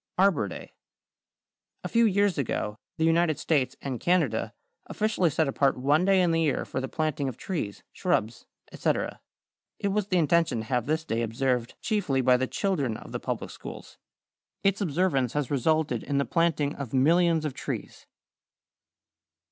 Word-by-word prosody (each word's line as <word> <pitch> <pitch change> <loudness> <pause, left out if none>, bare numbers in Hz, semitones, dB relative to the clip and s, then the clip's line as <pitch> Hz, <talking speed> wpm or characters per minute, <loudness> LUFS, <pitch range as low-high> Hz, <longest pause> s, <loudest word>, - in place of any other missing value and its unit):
=Arbor 185 - +3
Day.= 95 - -9 1.1
A - - -2
few 230 0 +3
years 200 -4 +2
ago 105 -5 -2 0.2
the 160 - +2
United 165 -1 +3
States 135 -5 0
and 130 -4 -3
Canada 165 -11 +1 0.4
officially 215 -5 +1
set 155 +1 +1
apart 135 0 +1
one 145 +7 +2
day 190 -1 +4
in 175 - +2
the 165 0 +2
year 155 -4 0
for 130 - -3
the 130 - -3
planting 155 -3 -1
of 125 - -8
trees, 150 - -4
shrubs, 110 +3 -1 0.2
etc. - - -1 0.6
It 200 - -1
was 205 0 0
the 185 - +1
intention 165 -4 +2
to 110 - -3
have 125 0 -1
this 160 +1 0
day 115 -4 -1
observed 120 +1 -1
chiefly 185 - 0
by 125 0 +5
the 130 +1 -1
children 145 - -1
of - - -11
the - - -3
public - - -4
schools. - - -10 0.6
Its 195 +1 +2
observance 155 - +1
has 150 -3 -2
resulted 145 -2 +1
in 140 - -2
the 140 - +2
planting 165 -4 +1
of 135 -3 -5
millions 165 +3 +3
of 150 - -2
trees. - - -6
150 Hz, 165 wpm, -27 LUFS, 130-175 Hz, 1.1 s, by